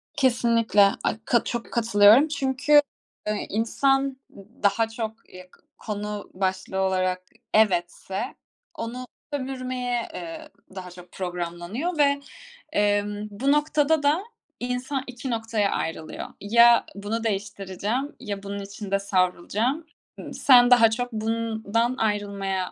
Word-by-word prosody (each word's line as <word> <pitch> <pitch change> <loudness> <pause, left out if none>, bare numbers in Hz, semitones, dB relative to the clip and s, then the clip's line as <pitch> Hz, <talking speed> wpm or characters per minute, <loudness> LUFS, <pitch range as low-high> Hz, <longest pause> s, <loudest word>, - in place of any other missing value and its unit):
Kesinlikle. 230 -6 +3
Ay - - 0
ka 235 - +3
çok 235 -1 -4
katılıyorum 230 +3 +6
çünkü, 290 0 +3 0.5
eee, 210 -1 -2
insan, 270 +5 +1 0.2
ııı, 195 - -13 0.2
daha 205 +3 +3
çok, 225 -1 -6
eee, 185 0 -12
k - - -24 0.2
konu 210 -1 -5
başlığı 190 0 -2
olarak 185 -1 0 0.3
evetse 195 +2 +1 0.4
onu 250 +2 -5 0.3
sömürmeye, 255 -3 -3
eee, 320 -2 -7 0.3
daha 180 -1 -7
çok 180 0 -14
programlanıyor 180 - -4
ve, 280 -1 +3 0.5
emm, 205 -1 0
bu 255 +8 0
noktada 295 +1 +2
da 300 +6 +2 0.4
insan 250 +2 -2
2 250 +1 -6
noktaya 225 -3 0
ayrılıyor. 160 -1 -4
Ya 235 +3 +6
bunu 210 +3 -3
değiştireceğim 205 +5 -3
ya 200 -1 -5
bunun 200 0 -5
içinde 200 0 -3
savrulacağım. 200 - 0 0.3
Imm, - - -8
sen 245 -2 +6
daha 230 -2 +7
çok 245 +2 -3
bundan 225 +1 -1
ayrılmaya. 200 -4 -1
225 Hz, 120 wpm, -25 LUFS, 200-255 Hz, 0.5 s, daha